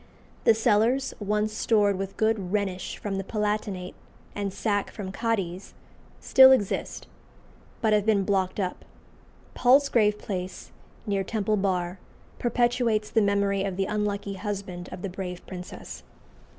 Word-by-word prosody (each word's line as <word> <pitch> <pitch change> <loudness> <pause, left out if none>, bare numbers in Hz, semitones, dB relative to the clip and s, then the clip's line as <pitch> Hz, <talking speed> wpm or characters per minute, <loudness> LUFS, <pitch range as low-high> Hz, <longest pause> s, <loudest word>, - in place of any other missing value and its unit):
The 225 - +6
cellars, 230 +4 +2
once 210 +1 0
stored 210 -2 +2
with 195 +1 -5
good 220 -4 0
Rhenish 195 -3 -2
from 195 -2 -3
the - - -3
Palatinate, 210 -3 -2 0.4
and 200 -1 -3
sack 205 +1 -1
from 190 -3 -6
Cadiz, 195 -4 -2 0.4
still 265 0 +7
exist, 210 -7 0 0.8
but 220 -2 +3
have 210 -1 +3
been 205 -2 +2
blocked 190 0 0
up. 185 -2 -3 0.7
Palsgrave 245 -5 +4
Place, 185 -3 -6 0.3
near 200 -3 0
Temple 215 +1 0
Bar, 185 -2 -1 0.4
perpetuates 240 -3 +1
the 225 - +3
memory 200 -1 +1
of 195 -2 -3
the 195 - +1
unlucky 205 -1 -2
husband 195 -3 -5
of 180 - -8
the - - -1
brave 180 -1 -6
princess. 180 -1 -8
205 Hz, 135 wpm, -26 LUFS, 190-215 Hz, 0.8 s, still